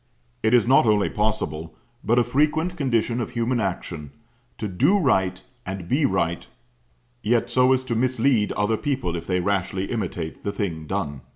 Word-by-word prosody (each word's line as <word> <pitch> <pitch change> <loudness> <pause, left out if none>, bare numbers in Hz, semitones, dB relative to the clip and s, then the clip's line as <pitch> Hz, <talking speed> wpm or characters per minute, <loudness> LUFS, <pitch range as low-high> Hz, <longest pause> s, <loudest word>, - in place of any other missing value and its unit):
It 110 +3 +4
is 120 - +4
not 130 -1 +5
only 105 -1 +3
possible, 85 -7 -2 0.3
but 120 +2 +2
a 120 - +5
frequent 150 +8 +1
condition 120 -5 0
of 115 - -3
human 120 0 -1
action, 85 -6 -3 0.5
to 110 - -3
do 100 - +3
right 95 - +1 0.2
and 95 -2 -6
be 140 - +2
right 85 -5 -1 0.7
yet 120 +2 +1
so 125 +1 +4
as 130 0 +2
to 130 -2 -3
mislead 125 -2 +2
other 105 +2 +1
people 130 - -2
if 85 0 -6
they 90 -1 +1
rashly 95 0 -1
imitate 90 -8 -4
the 100 - -1
thing 85 -7 -4
done. 75 -8 -3
110 Hz, 170 wpm, -24 LUFS, 95-125 Hz, 0.7 s, not